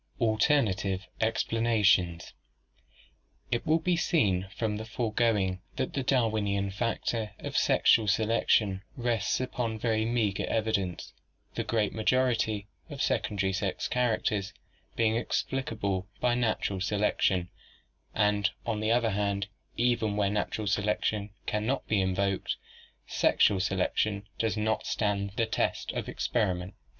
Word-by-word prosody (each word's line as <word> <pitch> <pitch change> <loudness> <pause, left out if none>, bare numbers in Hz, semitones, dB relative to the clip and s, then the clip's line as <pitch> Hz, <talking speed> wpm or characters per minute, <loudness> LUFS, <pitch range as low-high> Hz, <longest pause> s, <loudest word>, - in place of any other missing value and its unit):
Alternative 110 -5 +2 0.3
Explanations. 105 -7 +2 0.6
— - - -32
It 120 +7 -1
will 155 +1 +5
be 175 +1 +1
seen 100 - +1
from 110 -2 -1
the 110 - -5
foregoing 110 -4 0
that - - -2
the 140 - -1
Darwinian 110 -6 +1
factor 110 0 -2
of - - -7
sexual 110 -2 +4
selection 105 -2 +2 0.2
rests 120 -2 0
upon 120 -3 -2
very 110 -1 +1
meager 110 -4 0
evidence, 105 -5 -1 0.4
the - - -2
great 105 -4 0
majority 110 -3 +1 0.2
of - - -8
secondary 95 -2 0
sex 95 -1 -2
characters 110 -5 0
t - - -29 0.4
being 115 -1 +2
explicable 110 -7 -2
by 125 -1 +2
natural 110 -5 0
selection, 100 -3 +1 0.7
and 105 -2 +2 0.2
on 110 -2 -1
the 110 +1 0
other 115 -1 +3
hand 100 -1 -1 0.3
even 115 -3 +1
where 100 -1 +2
natural 105 +1 -2
selection 105 +1 0 0.2
can 105 +1 -1
not 135 +2 -1
be 105 -3 +2
invoked, 95 +1 0 0.5
sexual 100 +9 +3
selection 100 +2 0
does 115 -1 0
not 110 +1 0
stand 100 -2 -1
the 115 - +2
test 110 - -1
of - - -4
experiment. 95 -5 -1
105 Hz, 125 wpm, -29 LUFS, 100-115 Hz, 0.7 s, will